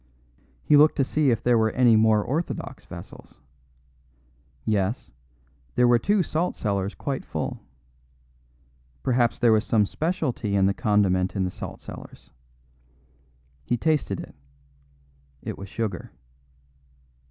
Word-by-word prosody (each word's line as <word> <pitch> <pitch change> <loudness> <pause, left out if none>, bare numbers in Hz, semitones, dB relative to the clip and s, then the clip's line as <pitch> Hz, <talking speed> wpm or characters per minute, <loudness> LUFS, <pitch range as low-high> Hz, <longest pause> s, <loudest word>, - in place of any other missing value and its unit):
He 150 - +5
looked 150 +2 +6
to 140 - +2
see 150 +1 +1
if 115 - 0
there 120 -1 +4
were 110 0 +3
any 120 -3 +5
more 110 -1 +4
orthodox 155 +9 -4
vessels. - - -12 1.3
Yes; 105 +2 -1 0.6
there 125 - +4
were 120 -1 +5
two 200 - +2
salt 165 +3 -1
cellars 100 -2 -2
quite 140 -2 -4
full. - - -4 1.4
Perhaps 120 -2 +2
there 120 -2 +4
was 110 0 +3
some 110 -2 +2
speciality 145 - -2
in 95 -1 +4
the 100 - +3
condiment 100 -3 +1
in 95 - 0
the 90 - -2
salt - - -8
cellars. - - -11 1.3
He 120 - 0
tasted 155 +1 0
it; - - -9 1.1
it - - -4
was 100 0 -9
sugar. 105 -5 -4
115 Hz, 130 wpm, -25 LUFS, 100-140 Hz, 1.4 s, looked